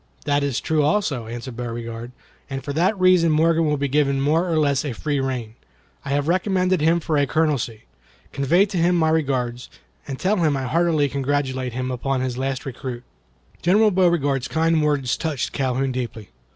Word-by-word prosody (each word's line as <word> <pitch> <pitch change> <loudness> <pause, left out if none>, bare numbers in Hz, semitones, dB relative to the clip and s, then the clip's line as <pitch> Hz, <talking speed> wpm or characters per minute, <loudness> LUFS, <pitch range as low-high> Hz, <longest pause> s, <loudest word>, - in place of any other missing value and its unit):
"That 145 0 +2
is 140 -3 -1
true 155 -1 0
also," 145 - 0
answered 120 +2 -7
Beauregard; 115 0 -6 0.4
"and 135 -1 -5
for 140 0 -4
that 180 +6 +1
reason 185 -3 +4
Morgan 160 +1 +3
will 150 0 +1
be 140 0 -1
given 140 0 +1
more 160 +6 +1
or 165 - +1
less 140 -3 +2
of 145 - -3
a - - -4
free 145 +3 -1
rein. 125 -5 -3 0.5
I - - -7
have 140 +1 0
recommended 185 0 +1
him 165 +2 +3
for 155 -2 -1
a 140 - +2
colonelcy. 140 -9 0 0.5
Convey 155 +8 +3
to 200 -2 -5
him 175 +2 +3
my 160 -2 +2
regards, 130 -6 -1 0.4
and 135 - -4
tell 200 +7 +1
him 155 -5 +2
I 135 - -3
heartily 155 +2 +2
congratulate 135 -2 -2
him 130 +1 -3
upon 130 +1 -1
his 130 -1 -2
last 135 +1 -3
recruit." 125 -2 -6 0.6
General 210 +5 +4
Beauregard's 165 -8 +2
kind 160 0 +1
words 145 -5 +1
touched 150 -6 -3
Calhoun 130 0 0
deeply. 120 -5 -5
145 Hz, 185 wpm, -22 LUFS, 130-165 Hz, 0.6 s, reason